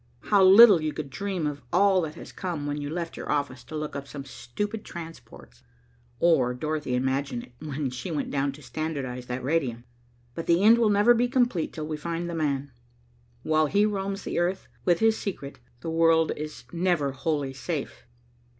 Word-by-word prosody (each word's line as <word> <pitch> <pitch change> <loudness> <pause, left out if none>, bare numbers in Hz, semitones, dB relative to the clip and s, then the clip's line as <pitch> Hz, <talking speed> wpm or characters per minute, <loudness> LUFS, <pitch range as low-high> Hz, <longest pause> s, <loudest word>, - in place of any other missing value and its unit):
How 200 -2 +3
little 195 -1 +9
you 155 -1 -2
could 145 -3 -6
dream 195 -1 -3
of 145 -1 -3
all 190 +1 +4
that 155 -2 -5
has - - -10
come 170 -6 -4
when 145 0 -3
you 145 - -4
left 170 +1 -4
your - - -5
office 140 -4 -2
to 155 - -8
look 150 0 -4
up 140 0 -5
some 140 -1 -8
stupid 205 - -5
transports, 165 - -11 0.6
or 130 -8 +3
Dorothy 150 -1 -2
imagine 130 -1 -1
it - - -15
when 145 -3 -3
she 125 +6 -6
went 155 -3 -3
down 140 0 0
to 150 +1 -14
standardize 135 -6 -4
that 125 0 -4
radium. 130 -5 -1 0.5
But 165 - -6
the 170 +3 +3
end 230 +3 +7
will 225 -2 +4
never 205 +4 +5
be 240 +1 +2
complete 245 - +1
till 155 -2 -5
we 155 0 -4
find 170 +2 -3
'the 170 - -4
man.' 140 -3 -1 0.7
While 155 0 +2
he 205 +7 +3
roams 200 -1 -2
the - - -2
earth 180 +2 -1 0.2
with 175 +1 +3
his 225 0 +3
secret 145 -8 -6 0.2
the 165 - -4
world 165 0 +4
is 150 0 -7
never 170 -5 +1
wholly 140 -1 -2
safe." 140 -2 -5
155 Hz, 190 wpm, -26 LUFS, 140-185 Hz, 0.7 s, little